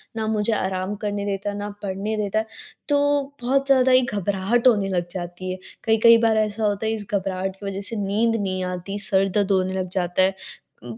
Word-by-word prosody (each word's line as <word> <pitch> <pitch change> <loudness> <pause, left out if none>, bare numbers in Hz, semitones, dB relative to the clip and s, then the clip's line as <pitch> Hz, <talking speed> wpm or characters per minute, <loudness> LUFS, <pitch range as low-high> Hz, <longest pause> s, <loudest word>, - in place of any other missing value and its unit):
ना 220 -1 -2
मुझे 220 0 +1
आराम 190 0 -2
करने 205 -1 -2
देता 200 0 -2
है, 205 - -4
ना 205 0 -4
पढ़ने 200 +2 -2
देता 210 0 0
है 220 - -2 0.4
तो 290 - +4 0.4
बहुत 275 +3 +1
ज़्यादा 260 -1 +4
ही 255 0 +6
घबराहट 205 +5 +1
होने 205 -5 +4
लग 175 -2 -1
जाती 180 0 -5
है। 185 - -4 0.3
कई-कई 225 +1 +6
बार 225 -1 +3
ऐसा 215 0 0
होता 205 0 0
है 220 - +1
इस 210 -2 -5
घबराहट 190 -1 -1
की 205 - -9
वजह 195 0 -3
से 225 - -4
नींद 210 +3 +1
नहीं 190 -3 -2
आती, 180 +2 -4
सर 195 -2 +2
दर्द 200 +1 0
होने 185 -1 +1
लग 185 -1 -2
जाता 180 0 0
है। 190 +1 +2 0.5
उम, 120 -2 -8
200 Hz, 215 wpm, -23 LUFS, 190-220 Hz, 0.5 s, ही